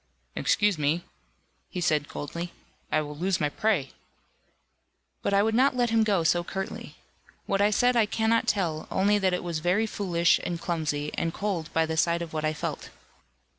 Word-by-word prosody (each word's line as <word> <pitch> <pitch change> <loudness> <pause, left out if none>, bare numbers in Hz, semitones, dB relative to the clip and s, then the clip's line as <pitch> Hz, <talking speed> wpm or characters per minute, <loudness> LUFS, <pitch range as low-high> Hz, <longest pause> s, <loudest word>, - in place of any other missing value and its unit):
"Excuse 205 -5 +2
me," 155 +4 +1 0.7
he - - -5
said 155 -4 +1
coldly, 170 +4 -5 0.4
"I 155 - +3
will 150 -1 -6
lose 185 +4 0
my 150 - +1
prey." 185 -7 0 1.3
But - - -1
I 200 0 +4
would 220 +1 +1
not 260 +3 +3
let 240 -2 +1
him 225 -1 +4
go 200 -6 +2
so 175 +2 +2
curtly. 190 +2 -6 0.5
What 195 0 0
I 205 - +5
said 245 +4 +3
I 225 -3 +4
cannot 225 +1 +1
tell, 170 -6 0
only 205 +2 +2
that 190 -2 +2
it 180 - -2
was 170 -3 -2
very 180 +7 +2
foolish, 175 -5 +2
and 170 -1 -3
clumsy, 150 -4 -2
and 165 -1 -2
cold 185 -6 -2
by 165 0 +2
the 160 0 -3
side 170 +2 +2
of 165 - -9
what 155 -1 -2
I 155 - +2
felt. 155 - -5
175 Hz, 185 wpm, -27 LUFS, 160-205 Hz, 1.3 s, I